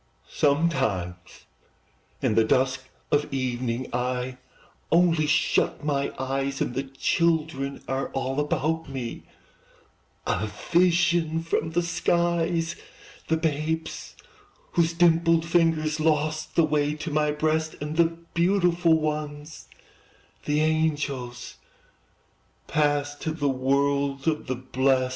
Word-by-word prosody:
Sometimes, 135 - 0 0.8
in - - +2
the 110 +1 +4
dusk 130 +3 +1 0.2
of 145 0 +1
evening, 125 -2 -2
I 125 +1 -2 0.5
only 165 -2 +4
shut 150 0 +1
my 140 -2 0
eyes, 135 +1 -2
And - - -1
the 135 - -1
children 140 0 -1
are 135 +1 -1
all 135 +1 -2
about 155 +2 -1
me, 130 -4 -6 1.0
A 110 - 0 0.2
vision 170 -2 +3
from 165 -1 -1
the 175 +1 +2
skies: 170 0 0 0.5
The 160 - +2
babes 160 +1 -2 0.6
whose 170 -1 +2
dimpled 165 -1 +3
fingers 160 -2 +2
Lost 155 0 0
the 165 - +5
way 150 -1 +1
to 155 +1 -5
my 150 0 +2
breast, 155 +1 0
And 150 +1 -4
the 170 0 +5 0.3
beautiful 175 -2 +3
ones, 150 0 -4 0.8
the 150 +1 +1
angels, 145 -6 -1 1.1
Passed 145 -1 0
to 160 - -2
the 145 -3 -1
world 140 +1 0
of 155 -1 0
the 130 - -1
blest. 130 +1 +1
150 Hz, 110 wpm, -26 LUFS, 135-165 Hz, 1.1 s, the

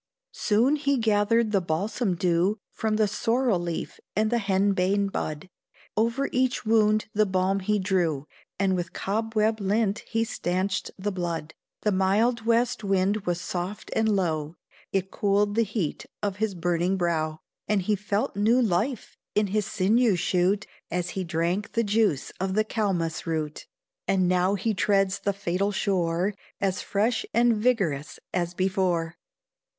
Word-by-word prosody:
Soon 235 +8 +2
he 280 -2 +1
gathered 220 0 +2
the 195 -2 +2
balsam 185 +5 -1
dew 180 +4 +1
From 220 -1 -1
the 215 -1 +3
sorrel 230 0 +1
leaf 170 -1 -4 0.2
and 215 +1 +1
the 240 - +2
henbane 195 0 +2
bud; 155 0 -4 0.5
Over 235 +5 +1
each 255 -1 0
wound 215 -1 +3
the 215 0 +3
balm 190 +1 +1
he 210 +2 +1
drew, 175 -7 0 0.3
And 190 -1 +2
with 175 -1 -3
cobweb 220 +1 0
lint 205 +1 +1
he 225 -1 +1
stanched 190 -2 -1
the 205 +2 -2
blood. 170 -4 -3 0.3
The 210 - +2
mild 215 +5 +2
west 235 0 +2
wind 195 +1 +1
was 175 -1 0
soft 180 +4 -5
and 220 -1 +2
low, 160 -4 -1 0.4
It 190 0 -1
cooled 205 0 +1
the 230 - +3
heat 210 -7 -2 0.2
of 200 -2 -1
his 215 -2 -1
burning 175 +2 0
brow, 160 -3 0 0.3
And 210 -3 +1
he 210 +3 +2
felt 205 +1 -2
new 220 +5 +3
life 230 +3 0 0.2
in 210 - +3
his 210 -2 +1
sinews 210 0 +2
shoot, 185 +4 +1 0.2
As 180 +1 -2
he 190 - -3
drank 170 +4 -1
the 230 - +2
juice 205 - +1
of 190 +1 -1
the 215 - +3
cal'mus 180 -8 -1
root; 155 -2 -3 0.4
And 185 -2 +2
now 185 +2 +2
he 220 +3 0
treads 195 -1 +2
the 200 - 0
fatal 200 0 -1
shore, 185 -1 0 0.3
As 190 -2 0
fresh 220 +4 0
and 235 0 +4
vigorous 200 - 0 0.2
as 175 -1 -1
before. 180 -3 0
200 Hz, 155 wpm, -26 LUFS, 180-215 Hz, 0.5 s, and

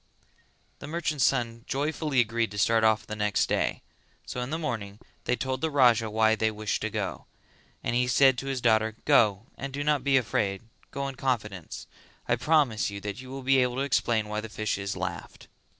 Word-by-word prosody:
The - - -8
merchant's 155 -3 0
son 115 -3 0
joyfully 145 -1 0
agreed 115 0 0
to 105 - -8
start 115 +2 +3
off 110 0 +3
the 110 - -6
next 105 -1 +1
day; - - -1 0.4
so 125 - -5
in 125 - -4
the 160 - -2
morning 110 -10 -4 0.3
they 125 - +2
told 130 0 -3
the 160 - +1
Raja 120 -6 +4
why 110 +1 +3
they 110 0 +1
wished 110 -1 -3
to - - -1
go, - - -4 0.6
and - - -1
he 125 0 +2
said 130 +1 +5
to 135 - -6
his 135 -2 -2
daughter 110 -2 +2
"Go 105 -1 +4
and 135 0 -4
do 140 +2 -3
not 150 -3 +1
be 135 -1 +4
afraid; 100 -4 -1 0.3
go 140 0 -3
in 135 - -5
confidence, 105 - -3 0.4
I 120 - +3
promise 130 -5 +2
you 100 0 -6
that 105 +3 -5
you 130 - -11
will 135 0 -7
be 135 +1 +4
able 125 -1 +1
to 135 - -1
explain 120 -5 +1
why 105 0 -3
the 110 - -8
fishes 100 -2 -3
laughed." 95 -2 -6
120 Hz, 200 wpm, -27 LUFS, 110-135 Hz, 0.6 s, said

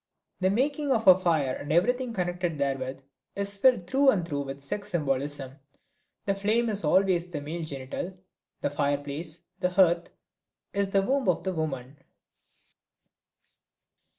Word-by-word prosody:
The 185 0 +2
making 280 +7 0
of 225 -4 +1
a 185 - +11
fire 160 -8 +1
and 145 - -5
everything 245 +9 +2
connected 175 -4 -2
therewith 135 -1 -2 0.3
is 200 0 -1
filled 225 -3 +4
through 270 +6 +4
and 180 -9 +2
through 145 -3 -2
with 135 0 -6
sex 140 +9 -5
symbolism. 140 -3 -1 0.7
The 195 - +2
flame 215 +4 +1
is 205 -2 -3
always 180 +2 +3
the 160 -4 -4
male 160 +4 -5
genital, 145 +5 -5 0.4
the - - 0
fireplace, 145 +3 -2 0.2
the 180 -1 +1
hearth, 175 -2 +3 0.6
is 200 -1 0
the 195 0 +2
womb 265 -1 +1
of 170 -1 +1
the 190 0 -1
woman. 140 -4 -4
175 Hz, 145 wpm, -28 LUFS, 145-200 Hz, 0.7 s, a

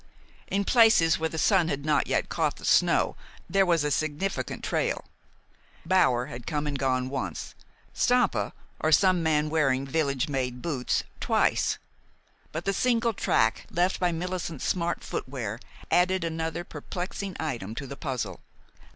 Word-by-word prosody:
In 200 0 0
places 220 -10 +5
where 160 0 0
the 160 - -6
sun 180 0 +3
had 140 -2 -3
not 150 -1 +2
yet - - 0
caught - - 0
the - - -10
snow - - +3 0.3
there 195 +2 +3
was 170 -3 +3
a 150 - 0
significant 155 +6 -2
trail. - - -1 0.8
Bower 145 -9 +3
had 125 -4 -9
come 150 -1 -1
and 145 -2 -2
gone 130 -1 +1
once, 135 0 -4 0.4
Stampa, 245 -4 +2 0.3
or 155 - +1
some 185 +2 +5
man 155 -1 +1
wearing 135 -4 +2
village 140 -2 0
made 130 -3 -2
boots, 130 -3 -1 0.2
twice; - - +2 0.7
but 160 +2 -5
the 195 - +1
single 235 +1 +2
track 115 - +1
left 180 +2 +1
by 180 -1 +2
Millicent's 170 -3 -4
smart 170 -1 -1
footwear 120 -5 -4 0.3
added 185 0 +3
another 165 0 -2
perplexing 185 +1 -5
item 120 -9 -3
to 140 - -5
the 140 - -7
puzzle. 125 - -4
160 Hz, 150 wpm, -27 LUFS, 135-180 Hz, 0.8 s, places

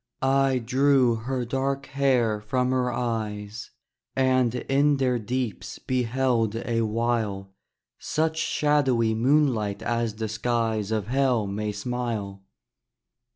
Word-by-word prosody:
I 135 0 +3
drew 130 +1 +3
her 125 +2 -3
dark 135 +2 -2
hair 125 -6 +1
from 125 +4 0
her 125 -1 +1
eyes, 110 -3 -4 0.5
And 130 -2 +2
in 140 +3 +2
their 125 -2 +1
deeps 120 -1 -4
beheld 125 -3 0
a 115 0 -1
while 110 -3 -1 0.5
Such 160 +1 -1
shadowy 135 -8 +2
moonlight 120 -4 +1
as 115 -2 -1
the 110 0 -3
skies 110 -1 -1
Of 110 -3 -1
Hell 125 -2 +1
may 105 +2 -3
smile. 105 -3 -4
120 Hz, 110 wpm, -25 LUFS, 110-130 Hz, 0.5 s, I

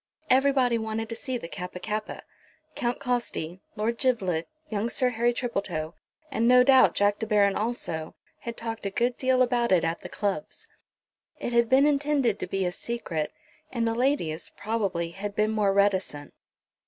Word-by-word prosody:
Everybody 260 -3 +4
wanted 220 0 -3
to 230 - -4
see 260 +1 -3
the 195 - -7
Kappa 180 +1 -7
kappa. 215 +2 -4 0.5
Count 245 -3 -2
Costi, 235 - -2
Lord 230 +2 -1
Giblet, 190 -11 0 0.2
young 215 -1 -1
Sir 255 +1 +1
Harry 240 0 +1
Tripletoe, 195 -10 -3 0.4
and, 230 +1 +1
no 250 0 +7
doubt, 265 0 +6
Jack 205 0 +2
De 220 - -3
Baron 205 -2 +3
also, 190 -8 -3 0.2
had 235 -1 -6
talked 225 -1 -5
a - - -1
good 240 +5 0
deal 255 -1 +3
about 240 -2 +1
it 180 -3 +4
at 165 +1 -1
the - - -8
clubs. 205 +7 -3 0.7
It 240 - -3
had 235 -1 +3
been 270 +2 +5
intended 285 -6 +2
to - - -3
be 195 -1 -1
a 180 - 0
secret, 175 -7 -3 0.4
and 230 -2 0
the 225 - +1
ladies, 235 - 0
probably, 200 -6 -1
had 200 +3 -5
been 215 +1 +2
more 210 -2 +2
reticent. 190 -7 0
225 Hz, 170 wpm, -27 LUFS, 195-245 Hz, 0.7 s, no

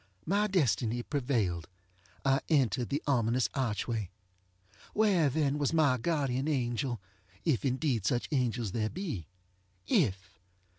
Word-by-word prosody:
My 205 +4 +2
destiny 120 - +1
prevailed. 115 - -1 0.6
I 135 +1 +3
entered 130 - +2
the 145 +2 -1
ominous 125 -2 +2
archway. 115 -5 -1 0.9
Where 195 -8 +4
then 145 0 0
was 145 +2 +1
my 145 -6 +3
guardian 140 -2 0
angel? 120 -4 -1 0.5
ŌĆöif 150 -8 +2
indeed 130 - 0
such 120 -1 0
angels 120 -6 0
there 110 0 -1
be. 145 - -5 0.6
If! 95 - 0
130 Hz, 115 wpm, -31 LUFS, 115-150 Hz, 0.9 s, Where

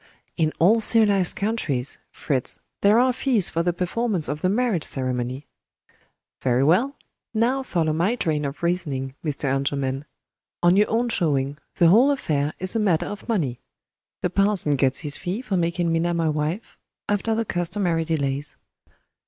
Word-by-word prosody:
"In 155 -3 +1
all 215 +7 +4
civilized 205 -4 +3
countries, 160 - -2
Fritz, 130 -4 -2 0.2
there 205 +2 +5
are 255 +1 +4
fees 240 -8 +3
for 165 - 0
the 175 +1 +1
performance 185 0 -1
of 150 +1 -4
the 185 - +2
marriage 215 -6 +1
ceremony." 130 +1 -3 1.0
"Very 125 0 +2
well. 225 - +2 0.4
Now 245 +5 +2
follow 165 -11 -1
my 175 +9 +1
train 155 -9 -1
of 140 +3 -5
reasoning, 145 -7 -2
Mr. 150 -3 -3
Engelman! 135 0 -1 0.6
On 175 +1 +5
your 210 +2 +3
own 235 +2 +1
showing, 145 -8 0 0.2
the 170 -2 +5
whole 235 +10 +6
affair 150 - -1
is 185 +4 -3
a - - +2
matter 190 -7 +2
of 205 +3 -8
money. 145 - -1 0.6
The 180 - 0
parson 195 -5 +2
gets 135 -1 +1
his 145 -3 -4
fee 195 +7 -4
for 215 -6 -2
making 170 -1 0
Minna 170 +1 0
my 165 -1 +1
wife, 155 +7 -3 0.3
after 205 +2 0
the 230 0 -1
customary 175 -2 -1
delays." 145 -3 -2
170 Hz, 160 wpm, -23 LUFS, 145-210 Hz, 1.0 s, whole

